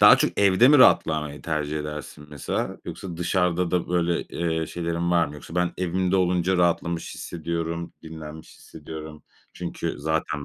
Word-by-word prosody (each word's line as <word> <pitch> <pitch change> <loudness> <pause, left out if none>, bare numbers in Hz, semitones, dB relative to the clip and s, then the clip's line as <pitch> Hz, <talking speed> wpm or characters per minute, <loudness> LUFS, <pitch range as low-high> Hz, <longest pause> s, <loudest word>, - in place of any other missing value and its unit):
Daha - - +9
çok - - 0
evde 100 +5 +6
mi 150 - +7
rahatlamayı 75 - +4
tercih 75 -1 -2
edersin 75 0 -7
mesela? 75 -2 -3
Yoksa 90 -3 -6
dışarıda 90 0 +1
da, 90 -2 0
böyle, 85 -1 +1
eee, 80 -1 -2
şeylerin 85 +1 -2
var 85 -1 +4
mı? 70 - -9
Yoksa, 75 +2 -10
"Ben 90 -1 +1
evimde 90 +1 +1
olunca 90 0 +2
rahatlamış 85 -1 0
hissediyorum, 85 0 -4
dinlenmiş 80 -1 -10
hissediyorum." 80 0 -9 0.3
çünkü - - -4
zaten 75 -1 -1
85 Hz, 150 wpm, -25 LUFS, 80-90 Hz, 0.3 s, Daha